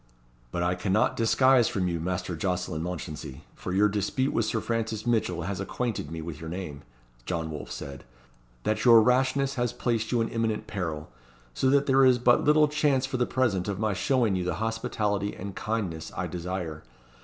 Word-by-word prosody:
"But 85 +3 -1
I 90 +1 +2
cannot 95 +4 +1
disguise 125 +1 +4
from 95 -2 -1
you, 85 -1 -1
Master 90 +1 -2
Jocelyn 90 -2 -2
Mounchensey 80 -5 -6
for - - -6
your 100 +3 +4
dispute 105 +7 -1
with 115 - +1
Sir 110 +1 0
Francis 115 -1 -2
Mitchell 110 -8 0
has 95 +2 -3
acquainted 110 -4 -3
me 80 0 -5
with 80 -2 -7
your 80 - -6
name," 85 -5 -6 0.5
John 80 -3 -2
Wolfe 75 - -7
said 70 -1 -7 0.6
"that 110 - 0
your 115 -2 +8
rashness 130 +3 +2
has 120 -2 +1
placed 115 -2 -1
you 120 - +2
in 115 - 0
imminent 115 -2 -1
peril; 80 -7 -4 0.4
so 130 - +1
that 140 +1 +4
there 135 -1 +4
is 130 -1 +6
but 120 0 +4
little 150 0 +5
chance 145 -3 +1
for 130 -1 -3
the 125 - +1
present 110 -8 0
of 100 -2 -2
my 105 0 0
showing 115 +1 +1
you 90 - -1
the 90 - -1
hospitality 105 -2 -1
and 100 0 -7
kindness 100 -7 -3
I - - -1
desire. 90 -3 -4
105 Hz, 190 wpm, -27 LUFS, 90-120 Hz, 0.6 s, your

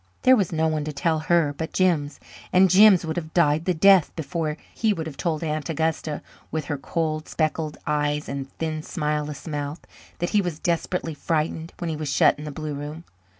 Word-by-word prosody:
There 260 0 +7
was 200 -8 0
no 160 -1 +1
one 155 -1 -1
to 155 - -3
tell 160 +2 0
her 160 -2 +2
but 160 +3 -5
Jims, 165 -6 +1 0.3
and 185 0 +5
Jims 195 -2 +7
would 160 0 -3
have 155 -2 -5
died 160 -2 +3
the 185 - +2
death 190 0 +6
before 160 -1 -3 0.2
he 220 -2 +1
would 165 -4 -4
have 155 -3 -7
told 160 0 -2
Aunt 155 -1 -2
Augusta, 160 -1 -1 0.3
with 155 -1 -3
her 145 -1 -2
cold, 155 +1 -2
spectacled 155 -1 -1
eyes 150 0 0
and 135 -1 -5
thin, 155 -1 -2
smileless 150 -2 -3
mouth, 145 0 -4 0.4
that 175 - -2
he 210 - +4
was 175 -5 -3
desperately 170 0 -1
frightened 160 +2 -2
when 170 -2 -3
he - - -2
was 150 -2 -3
shut 140 - +4
in 150 - -7
the 150 - -5
blue 155 +1 -5
room. 150 +3 -6
155 Hz, 200 wpm, -24 LUFS, 150-170 Hz, 0.4 s, There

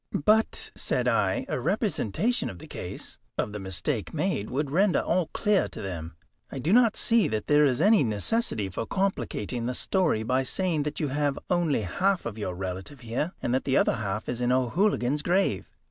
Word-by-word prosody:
"But," 220 +1 +3
said - - -1
I, - - +1
"a - - -2
representation 215 - 0
of 95 - -8
the - - -11
case - - -7 0.2
of 105 - -1
the 105 - -4
mistake 95 -2 -2
made 105 - -1
would 140 +1 -2
render 190 +4 +3
all 175 -1 0
clear 210 -3 +2
to - - -10
them. 85 -4 -6 0.4
I - - -5
do 155 +9 +1
not 235 -2 +5
see 230 -2 +3
that 110 -1 -2
there 150 0 +5
is 130 -2 +1
any 205 +1 +5
necessity 110 - 0
for 105 +4 -4
complicating 125 - -2
the 125 - -2
story 175 - +1
by 130 +3 +1
saying 165 +4 -1
that 150 - -9
you 150 - -1
have 145 0 0
only 170 -8 +2
half 185 - 0
of 115 -3 -4
your 95 -4 -3
relative 95 +9 -6
here, 125 +9 -2
and 120 - 0
that 130 - +1
the 135 - +1
other - - +2
half 105 -1 -3
is 125 - -3
in 125 0 +2
O'Hooligan's 135 - +1
grave. 185 +5 +1
135 Hz, 190 wpm, -27 LUFS, -, 0.4 s, not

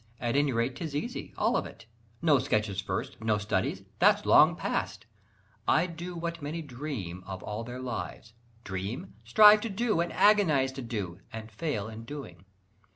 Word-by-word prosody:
At 120 0 -1
any 145 -1 +3
rate 120 +2 0
'tis 155 -4 -5
easy, 145 - -4
all - - +2
of - - 0
it, 110 - -14 0.4
No 150 -5 +5
sketches 105 -7 0
first, 100 - -4
no 110 -1 +2
studies, 100 -2 -1 0.2
that's - - +4
long - - +6
past 105 - -3 0.6
I - - +4
do 175 +1 -7
what 170 -1 -4
many 155 +3 -4
dream 120 - -6
of 95 -1 -6
all 105 +2 -4
their 125 +2 -7
lives 120 -2 -6 0.3
Dream? 95 +2 -5
strive 210 - +7
to 230 - -3
do, 215 -2 0
and 170 - -2
agonise 165 -11 +4
to 135 0 -7
do, 100 -7 -4
And 110 0 -8
fail 110 -3 -3
in 110 0 -8
doing. 105 - -9
125 Hz, 170 wpm, -29 LUFS, 105-160 Hz, 0.6 s, strive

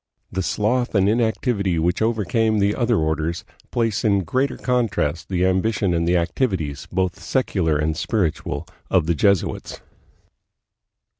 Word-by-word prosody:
The 95 - -1
sloth 115 +6 0
and 100 -1 +4
inactivity 110 -4 +1
which 85 +5 0
overcame 110 0 +1
the 100 0 +2
other 120 -1 +1
orders 80 +2 -1 0.2
place 115 -3 0
in 100 -3 +2
greater 130 - 0
contrast 110 - -1
the 90 -1 +1
ambition 95 0 +1
and 85 0 0
the 90 +1 +3
activities, 85 - -1
both 95 0 -1
secular 90 - 0
and 75 +1 0
spiritual, 85 +1 -2 0.2
of - - +3
the 85 - +2
Jesuits. 100 +3 0
95 Hz, 135 wpm, -22 LUFS, 85-110 Hz, 0.2 s, and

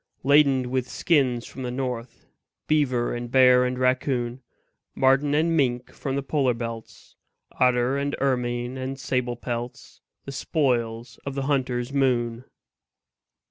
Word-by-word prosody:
Laden 135 -3 +4
with 130 -1 -1
skins 130 -8 +1
from 135 - -9
the 125 - -3
north, 125 -2 -5 0.4
Beaver 130 -6 +1
and 120 0 -5
bear 125 0 +6
and 125 0 -2
raccoon, 130 -1 0 0.5
Marten 135 +2 +3
and 165 +2 +2
mink 125 -4 0
from 135 -2 -4
the 140 - -2
polar 135 -4 +1
belts, 115 -1 -8 0.4
Otter 125 +2 +3
and 140 0 -2
ermine 125 -1 -1
and 130 +1 -4
sable 125 -2 -1
pelts 120 0 -6 0.2
The 140 - -6
spoils 120 -5 -1
of 140 -1 -5
the 135 - -2
hunter's 130 -2 -1
moon. 125 -3 0
130 Hz, 135 wpm, -25 LUFS, 120-135 Hz, 0.5 s, bear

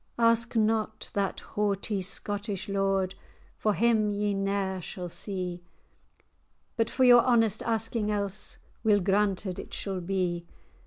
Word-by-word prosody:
"Ask 230 0 +3
not 220 0 0
that 200 -1 -1
haughty 205 -1 -1
Scottish 200 +1 -2
lord, 195 -1 +1 0.5
For 215 -2 +1
him 225 -2 +3
ye 205 0 0
ne'er 195 -1 -1
shall 180 +1 -6
see. 180 -1 -4 1.1
But 225 -1 +1
for 260 - +1
your 245 -1 +8
honest 225 -4 +3
asking 225 -1 -1
else, 205 -1 -2 0.3
Weel 210 -2 +4
granted 195 -1 0
it - - -7
shall 190 -2 -3
be." 175 -2 -1
205 Hz, 125 wpm, -28 LUFS, 190-220 Hz, 1.1 s, your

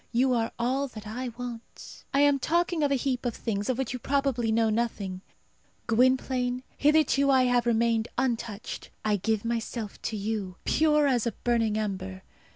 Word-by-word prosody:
You 255 +2 +3
are 225 -2 0
all 260 +4 0
that 220 -4 -10
I 245 +5 -4
want. 240 -2 -8
I 275 - +3
am 285 -1 +4
talking 340 +3 +1
of 290 -1 +2
a - - +4
heap 255 -1 -1
of 245 -3 -2
things 205 -1 -3
of 255 - +1
which 265 -2 -2
you 250 - -4
probably 265 -3 0
know 225 0 +2
nothing. 210 -5 -2 0.6
Gwynplaine, 250 +1 +2
hitherto 290 -2 +3
I 260 -1 +5
have 245 -1 +2
remained 230 -1 +2
untouched; 235 -4 -3 0.2
I 210 -1 +2
give 220 +2 -1
myself 230 -2 -3
to 220 - -3
you, 205 -3 -3
pure 300 -1 +3
as 245 -4 +2
a 230 - -1
burning 225 -3 +1
ember. 190 -3 -4
240 Hz, 170 wpm, -27 LUFS, 220-265 Hz, 0.6 s, I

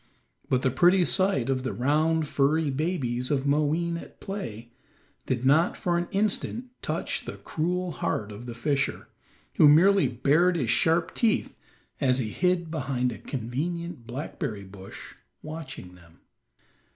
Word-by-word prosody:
But 130 -1 +1
the 130 - +2
pretty 175 +7 +4
sight 185 - +2
of 135 -1 0
the 130 - -3
round, 155 +5 +1
furry 145 +2 +1
babies 130 -5 -1
of 140 -2 0
Moween 155 +4 +1
at - - -15
play 120 - -6 0.6
did 130 -1 -1
not 155 +6 +4
for 175 -1 0
an 175 0 0
instant 215 +4 -1
touch - - -2
the - - -5
cruel 180 +3 -2
heart 110 -6 -2
of 110 +4 -9
the 120 - -6
fisher, 135 +3 -1 0.5
who 150 - +8
merely 180 +1 +6
bared 145 +9 +2
his 125 -8 0
sharp 165 +1 +2
teeth 225 -3 +1 0.4
as 130 -3 +3
he 120 -5 -1
hid 175 - 0
behind 130 -5 -1
a - - -8
convenient 145 +3 -4
blackberry 120 -5 -5
bush 95 0 -11 0.3
watching 150 - -8
them. 85 -2 -19
145 Hz, 145 wpm, -27 LUFS, 125-170 Hz, 0.6 s, who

